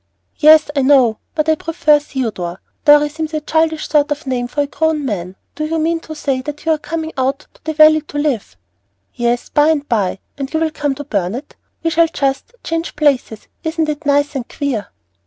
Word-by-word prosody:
"Yes, 310 Hz, -1 st, +6 dB
I 280 Hz, -, +2 dB
know, 260 Hz, -5 st, +4 dB, 0.2 s
but 305 Hz, 0 st, 0 dB
I 315 Hz, -, +5 dB
prefer 310 Hz, -1 st, +2 dB
Theodore. 220 Hz, -11 st, -4 dB, 0.3 s
Dorry 295 Hz, 0 st, +7 dB
seems 310 Hz, +1 st, -5 dB
a -, -, +1 dB
childish 320 Hz, +1 st, 0 dB
sort 295 Hz, -1 st, +2 dB
of 295 Hz, +1 st, -3 dB
name 250 Hz, -2 st, -1 dB
for 290 Hz, +4 st, -1 dB
a -, -, +1 dB
grown 310 Hz, 0 st, -1 dB
man. 185 Hz, -6 st, -4 dB, 0.2 s
Do 305 Hz, -, -3 dB
you 325 Hz, +1 st, -1 dB
mean 330 Hz, +1 st, 0 dB
to 315 Hz, -1 st, -9 dB
say 275 Hz, -3 st, -1 dB
that 295 Hz, +3 st, -7 dB
you 325 Hz, -, +2 dB
are 310 Hz, -, +1 dB
coming 320 Hz, +1 st, -4 dB
out 270 Hz, +3 st, -1 dB
to -, -, -23 dB
the 315 Hz, 0 st, -3 dB
Valley 310 Hz, 0 st, +7 dB
to 295 Hz, -1 st, -8 dB
live?" 270 Hz, -, -1 dB, 0.6 s
"Yes, 240 Hz, 0 st, -1 dB
by 295 Hz, 0 st, +3 dB
and 295 Hz, -2 st, +1 dB
by, 205 Hz, -6 st, 0 dB, 0.2 s
and 275 Hz, 0 st, -4 dB
you 315 Hz, -, 0 dB
will 320 Hz, -1 st, 0 dB
come 290 Hz, -2 st, -2 dB
to 290 Hz, -, -6 dB
Burnet; 215 Hz, -, -3 dB, 0.3 s
we 330 Hz, -, +1 dB
shall 330 Hz, +1 st, +4 dB
just 280 Hz, -, -2 dB
change 330 Hz, 0 st, -3 dB
places. 275 Hz, -7 st, 0 dB, 0.2 s
Isn't 320 Hz, -1 st, -1 dB
it 300 Hz, 0 st, -4 dB
nice 285 Hz, +1 st, +2 dB
and 250 Hz, -3 st, -4 dB
queer?" 265 Hz, -8 st, -3 dB
295 Hz, 210 wpm, -17 LUFS, 265-315 Hz, 0.6 s, Dorry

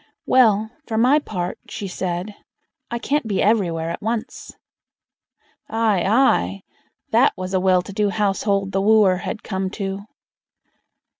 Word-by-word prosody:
"Well! 220 Hz, -4 st, +3 dB, 0.2 s
for 220 Hz, -, -2 dB
my 255 Hz, +6 st, +4 dB
part", 180 Hz, -10 st, -5 dB
she 200 Hz, -, -5 dB
said, 180 Hz, +2 st, -4 dB, 0.6 s
"I 235 Hz, -, -2 dB
can't 275 Hz, +1 st, -1 dB
be 200 Hz, -3 st, -1 dB
everywhere 170 Hz, -6 st, +1 dB
at -, -, -6 dB
once." 225 Hz, +1 st, -4 dB, 1.2 s
Aye! 220 Hz, -5 st, +1 dB
aye! 100 Hz, -, +2 dB, 0.5 s
that -, -, +4 dB
was 185 Hz, 0 st, -5 dB
a 190 Hz, -, +2 dB
well 185 Hz, -1 st, +3 dB
to 200 Hz, -, -9 dB
do 205 Hz, 0 st, +1 dB
household 200 Hz, -1 st, 0 dB
the 195 Hz, -, 0 dB
wooer 205 Hz, -3 st, +4 dB
had 210 Hz, +4 st, -5 dB
come 190 Hz, -2 st, -3 dB
to. 195 Hz, -1 st, -4 dB
200 Hz, 140 wpm, -21 LUFS, 185-220 Hz, 1.2 s, my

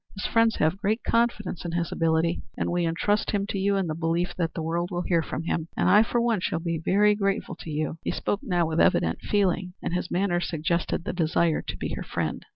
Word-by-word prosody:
His 195 Hz, -, -4 dB
friends 230 Hz, -1 st, +3 dB
have 160 Hz, +4 st, +1 dB
great 215 Hz, +3 st, 0 dB
confidence 230 Hz, -6 st, 0 dB
in 170 Hz, -1 st, -4 dB
his 170 Hz, -1 st, -1 dB
ability, 165 Hz, +1 st, +1 dB, 0.2 s
and -, -, -1 dB
we 175 Hz, -1 st, +1 dB
intrust 205 Hz, +5 st, 0 dB
him 200 Hz, -1 st, 0 dB
to 195 Hz, -, -2 dB
you 200 Hz, +1 st, +2 dB
in 195 Hz, -1 st, +1 dB
the 160 Hz, -, -2 dB
belief 165 Hz, +2 st, -1 dB
that 165 Hz, -2 st, -2 dB
the 165 Hz, -, -3 dB
world 170 Hz, +2 st, -1 dB
will 175 Hz, 0 st, -2 dB
hear 170 Hz, -2 st, +2 dB
from 160 Hz, -, -4 dB
him 165 Hz, -1 st, -2 dB
and -, -, +2 dB
I, 205 Hz, +3 st, +8 dB
for 235 Hz, +2 st, +1 dB
one, 235 Hz, -3 st, +2 dB
shall 170 Hz, -, -1 dB
be 165 Hz, -1 st, -2 dB
very 210 Hz, +4 st, +4 dB
grateful 200 Hz, 0 st, -1 dB
to -, -, -9 dB
you." 155 Hz, +2 st, -2 dB
He -, -, -2 dB
spoke 205 Hz, -, -1 dB
now 175 Hz, -3 st, +1 dB
with 160 Hz, 0 st, -1 dB
evident 80 Hz, 0 st, +2 dB
feeling, 185 Hz, -2 st, 0 dB
and -, -, -4 dB
his 180 Hz, 0 st, -2 dB
manner 180 Hz, -1 st, +1 dB
suggested 170 Hz, 0 st, -1 dB
the -, -, -3 dB
desire 165 Hz, -1 st, +1 dB
to -, -, -6 dB
be -, -, -4 dB
her -, -, -4 dB
friend. -, -, -3 dB
175 Hz, 240 wpm, -26 LUFS, 165-200 Hz, 0.2 s, I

